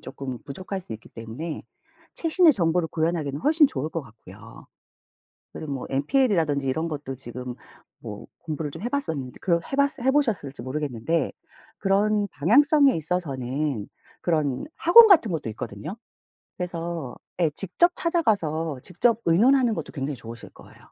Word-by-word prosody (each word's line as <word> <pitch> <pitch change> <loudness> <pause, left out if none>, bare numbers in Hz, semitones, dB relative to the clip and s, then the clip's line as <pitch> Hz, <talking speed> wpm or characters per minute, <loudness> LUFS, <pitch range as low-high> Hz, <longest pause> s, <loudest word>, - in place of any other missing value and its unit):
조금 130 -1 -6
부족할 185 +7 -5
수 175 - -9
있기 110 +1 -10
때문에 120 +9 -7 0.5
최신의 330 0 +4
정보를 170 - +2
구현하기는 160 -3 -1
훨씬 305 - +5
좋을 150 - -3
것 165 0 -4
같고요. 115 -4 -14 0.9
그리고 150 -2 -6
뭐 135 -2 -4
NPL이라든지 150 - +1
이런 160 +6 -1
것도 145 -3 -5
지금 125 0 -7 0.4
뭐 - - -8
공부를 155 -2 -4
좀 - - -7
해봤었는데 185 - -3
그 170 -3 +2
해봤으 280 -1 +1
해보셨을지 235 - 0
모르겠는데. 135 +2 -2 0.5
그런 205 +1 +2
방향성에 275 - +4
있어서는 145 - -2 0.3
그런 150 -6 0
학원 445 +7 +8
같은 310 - +5
것도 155 -8 -3
있거든요. 110 - -7 0.6
그래서 170 -6 -4 0.2
예 165 -3 +3
직접 275 - +2
찾아가서 165 - 0
직접 220 +6 +2
의논하는 235 +8 +4
것도 - - -5
굉장히 140 0 -3
좋으실 115 -1 -10
거예요. - - -17
165 Hz, 345 characters per minute, -25 LUFS, 135-215 Hz, 0.9 s, 학원